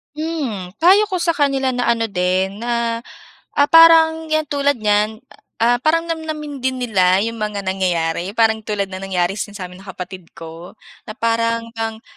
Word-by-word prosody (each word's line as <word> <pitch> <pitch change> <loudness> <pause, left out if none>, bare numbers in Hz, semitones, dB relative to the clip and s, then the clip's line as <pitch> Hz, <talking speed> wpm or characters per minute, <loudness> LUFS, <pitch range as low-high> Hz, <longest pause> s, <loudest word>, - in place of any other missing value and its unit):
Hmm, 295 - -4
payo 395 +5 +5
ko 370 - -1
sa 340 -1 +1
kanila 275 -3 0
na 245 0 -1
ano 230 -1 +1
din, 190 +1 -1
na, 235 -1 -1 0.5
ah, 285 0 +3
parang 325 -1 +6
yan 310 0 +1
tulad 285 0 +1
niyan, 215 0 0 0.4
ah, 240 +1 +3
parang 330 +5 0
namnamin 310 -3 -5
din 260 0 -2
nila 190 -5 +2
yung 230 +1 -4
mga 210 -2 -3
nangyayari 180 -1 -1
parang 225 -1 +3
tulad 200 -2 -2
ng 190 0 -6
nangyari 185 +1 -1
sin 205 0 -5
samin 180 -2 -8
ng 195 - -15
kapatid 185 -1 -8
ko, 165 +3 -11 0.3
na 215 - -7
parang 230 0 -1
ngang 225 0 -4
230 Hz, 170 wpm, -19 LUFS, 195-285 Hz, 0.5 s, parang